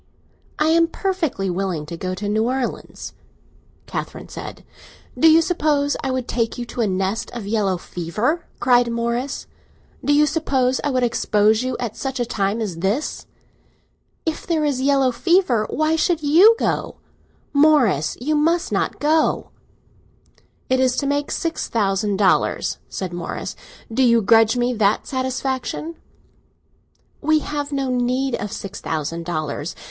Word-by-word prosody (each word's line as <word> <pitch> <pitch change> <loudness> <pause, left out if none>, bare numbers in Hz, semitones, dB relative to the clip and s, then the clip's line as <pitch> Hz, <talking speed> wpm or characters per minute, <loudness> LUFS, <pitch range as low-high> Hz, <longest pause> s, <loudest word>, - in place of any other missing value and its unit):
"I 305 +1 +2
am 330 +1 +4
perfectly 330 - -2
willing 180 -4 -2
to 170 - -7
go 185 +2 -4
to 205 +2 -4
New 215 +2 +1
Orleans." 255 0 -4 0.7
Catherine - - -6
said. - - -8 0.5
"Do 325 - +5
you 325 +1 +6
suppose 300 -4 +1
I 270 - -1
would 255 -2 -2
take 230 0 -1
you 240 - -4
to 245 - -2
a 220 - +2
nest 190 +2 -1
of 235 -4 -5
yellow 200 -3 0
fever?" 210 - -2
cried 245 -1 +4
Morris. 235 +3 -2 0.6
"Do 290 - +1
you 295 +1 +5
suppose 265 -5 0
I 295 - +1
would 255 -2 +1
expose 215 -2 +2
you 255 -1 -2
at 235 -3 -4
such 270 -1 -4
a 240 - +1
time 210 -1 -1
as 195 -6 -3
this?" 200 - -2 1.0
"If 320 -1 -3
there 320 -3 +1
is 275 -3 0
yellow 270 -1 +3
fever, 305 - +2
why 310 +2 +1
should 330 -1 +1
you 350 +10 +7
go? - - -1 0.6
Morris, 280 - +3
you 290 +6 -1
must 335 +4 +1
not - - -1
go!" 310 +2 +1 1.2
"It 260 0 +2
is 255 -1 +2
to 280 - -1
make 285 +1 0
six 330 -1 -2
thousand 200 -2 0
dollars," 195 -2 +1
said 185 -2 -5
Morris. 175 -1 -5 0.4
"Do 265 - +1
you 235 -3 +4
grudge 225 +3 +5
me 245 +1 +1
that 210 -2 +1
satisfaction?" 260 +4 -3 1.3
"We 310 +1 +3
have 290 -1 -4
no 275 -2 -1
need 250 +2 0
of 205 -3 -3
six 195 - -7
thousand 165 +2 -3
dollars. 155 -1 -3
250 Hz, 155 wpm, -21 LUFS, 205-290 Hz, 1.3 s, you